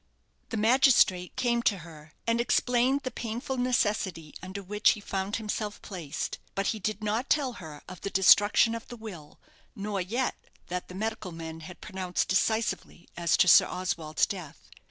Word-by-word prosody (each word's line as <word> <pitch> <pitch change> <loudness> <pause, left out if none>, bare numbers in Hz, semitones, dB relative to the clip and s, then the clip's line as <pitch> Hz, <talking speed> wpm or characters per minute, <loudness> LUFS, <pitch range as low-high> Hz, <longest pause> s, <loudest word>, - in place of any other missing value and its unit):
The 225 - -3
magistrate 230 -6 +4
came 240 -2 +1
to 210 -4 +2
her, 155 -2 -14
and 230 0 +2
explained 250 +3 +2
the 255 - -3
painful 240 +4 -4
necessity 210 -10 0
under 190 +2 -7
which 210 +3 +3
he 215 - -8
found 195 0 -3
himself 210 -1 -3
placed. 165 -7 -5 0.2
But 195 - -1
he 220 - -7
did 215 +1 -3
not 220 +5 -1
tell 275 -4 +2
her 150 -3 -10
of 185 -1 -10
the 200 - -3
destruction 205 +4 +5
of 230 0 -6
the 240 - -9
will, 185 -10 -10 0.4
nor 200 -1 -3
yet 235 +8 -1 0.3
that 180 0 -4
the 180 - -10
medical 215 -2 -3
men 165 -1 -7
had 175 +3 -11
pronounced 185 -2 -2
decisively 220 -2 0
as 170 -1 +2
to - - +4
Sir - - +8
Oswald's 165 -4 -1
death. 180 -7 -8
205 Hz, 170 wpm, -28 LUFS, 180-230 Hz, 0.4 s, Sir